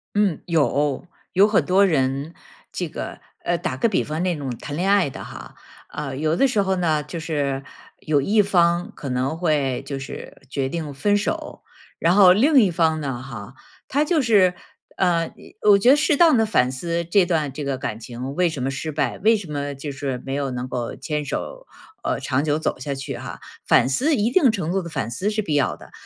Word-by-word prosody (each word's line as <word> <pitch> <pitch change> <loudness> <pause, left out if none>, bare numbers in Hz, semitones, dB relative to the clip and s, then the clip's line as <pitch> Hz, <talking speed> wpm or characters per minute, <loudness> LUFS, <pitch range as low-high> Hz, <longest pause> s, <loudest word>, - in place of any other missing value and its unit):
嗯。 205 -6 +2
有， 145 -1 +1 0.3
有 195 +3 +6
很 210 - +2
多 190 +2 +4
人， 140 0 0 0.4
这 - - -3
个 - - -6 0.3
呃， 175 - +1
打 180 +2 -3
个 235 - +2
比 210 - +1
方 155 +2 -3
那 180 -3 0
种 140 -3 -4
谈 145 - -6
恋 185 +4 +1
爱 200 -6 +4
的 - - -8
哈。 - - -10 0.4
呃， 140 -3 -5
有 155 +3 0
的 275 - +4
时 220 -5 +1
候 190 0 0
呢， 160 -4 +1
就 170 +3 -7
是 140 -4 -2 0.4
有 150 -2 +1
一 210 +9 +3
方 175 -3 +2
可 140 - -7
能 130 +4 -1
会 145 -7 0
就 140 -1 -4
是 135 - -9
决 135 -1 -2
定 155 -2 -4
分 205 +9 +2
手， 205 - -3 0.4
然 170 +2 +3
后 190 -3 +8
另 270 +8 +5
一 205 -5 +3
方 160 -2 +1
呢 135 -4 -4
哈， 120 -2 -9 0.3
他 290 +3 +2
就 310 -1 +2
是 200 -7 +4 0.4
呃， 170 -3 +1
一 - - -16 0.2
我 200 - +7
觉 240 +6 +5
得 280 - +7
适 300 0 +2
当 320 -3 +6
地 225 - +3
反 130 -12 +2
思 170 +5 -2
这 175 +2 +3
段 155 -5 0
这 145 +2 -6
个 140 -1 -1
感 110 -4 -5
情 125 +4 -6
为 180 +2 +2
什 145 -5 -5
么 135 - 0
失 140 +4 -4
败， 150 0 -1
为 220 +3 +4
什 195 -6 -7
么 145 -1 -3
就 140 +1 -6
是 135 -2 -4
没 135 - -3
有 140 -1 -1
能 125 0 -4
够 120 -2 -4
牵 150 -2 -3
手 - - -5 0.4
呃， - - -1
长 135 +1 0
久 150 0 +1
走 160 - -2
下 140 +2 -4
去 135 0 -6
哈。 - - -8 0.3
反 - - +5
思， 270 - +1
一 220 +3 +1
定 275 -4 +5
程 180 -6 -2
度 195 - +1
的 170 - -7
反 135 -8 -3
思 185 - -1
是 215 0 -1
必 155 - -2
要 145 -3 +1
的。 - - -15
160 Hz, 235 characters per minute, -22 LUFS, 135-195 Hz, 0.4 s, 后